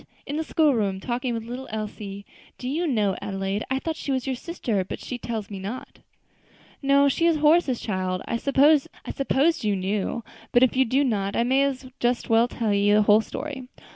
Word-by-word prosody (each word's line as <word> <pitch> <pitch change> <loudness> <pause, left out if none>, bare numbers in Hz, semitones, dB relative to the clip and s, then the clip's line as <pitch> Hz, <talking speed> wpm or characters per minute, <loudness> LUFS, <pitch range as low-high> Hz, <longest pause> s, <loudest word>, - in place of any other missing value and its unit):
In 285 - -4
the 320 - -1
school 310 -2 +3
room, 200 -5 0
talking 245 +4 -2
with 225 - -4
little 245 +3 -7
Elsie. 205 -2 -6 0.3
Do 250 - -6
you 325 +6 -1
know, 210 -8 +1
Adelaide, 195 +1 -2
I 265 - +1
thought 320 +4 -3
she 285 - -4
was 260 -2 -1
your 265 -1 -1
sister; 240 - -2
but 185 - -6
she 250 - -6
tells 220 -4 -5
me 195 - -5
not." 210 +7 -7 0.8
"No, 280 0 +4
she 335 +5 +2
is 330 -2 +3
Horace's 300 -4 +3
child. 185 -3 -2
I 230 - -1
supposed 280 +2 +2
you 210 -2 +1
knew; 195 +4 -2 0.3
but 245 - +5
if 255 - +3
you 265 0 +4
do 265 +4 +2
not, 200 -6 -1
I 235 - +2
may 270 +3 +3 0.3
just 240 0 +1
as - - -16
well 225 +1 +5
tell 225 -3 -1
you 205 +1 +3
the 210 - +5
whole 210 +1 +5
story. 265 +2 -6
240 Hz, 200 wpm, -25 LUFS, 205-275 Hz, 0.8 s, but